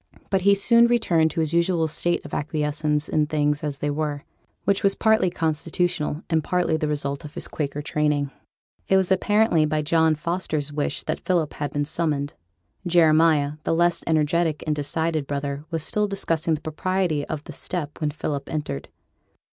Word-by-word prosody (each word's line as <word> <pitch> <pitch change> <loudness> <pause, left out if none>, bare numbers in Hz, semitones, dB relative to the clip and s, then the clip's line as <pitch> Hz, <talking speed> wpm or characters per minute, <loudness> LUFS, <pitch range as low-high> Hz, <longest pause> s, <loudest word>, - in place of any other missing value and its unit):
But 190 -1 +2
he 200 +2 +5
soon 235 +4 +5
returned 180 -10 +2
to 165 - -2
his 160 0 0
usual 170 -1 +2
state 175 +3 0
of - - -10
acquiescence 150 0 -1
in 150 -1 +1
things 150 0 0
as 145 -2 -2
they 145 +1 -2
were, 145 -1 -2 0.4
which 200 0 +1
was 195 0 +3
partly 220 -4 +3
constitutional, 160 -1 -1
and 160 -2 +1
partly 180 -3 +1
the 155 -1 -1
result 140 -2 -2
of 150 +1 -10
his - - -4
Quaker 145 -1 -4
training. 150 -2 0 0.6
It 190 - +4
was 190 -1 +1
apparently 205 -3 +3
by 155 0 0
John 160 0 +3
Foster's 155 -2 -2
wish 145 0 -2
that - - -3
Philip 170 -5 0
had 145 -1 -3
been 145 0 -1
summoned. 150 -3 -1 0.5
Jeremiah, 155 -3 +4
the 165 - 0
less 175 +1 +2
energetic 160 0 +1
and 155 -1 0
decided 155 0 -1
brother, 140 0 -3
was 165 -3 -2
still 210 +5 +1
discussing 165 -5 0
the 150 - -8
propriety 160 0 -1
of 155 -2 -4
the - - -9
step 160 -5 -4
when 150 - +1
Philip 145 -1 -4
entered. 145 - -4
155 Hz, 175 wpm, -24 LUFS, 150-175 Hz, 0.6 s, he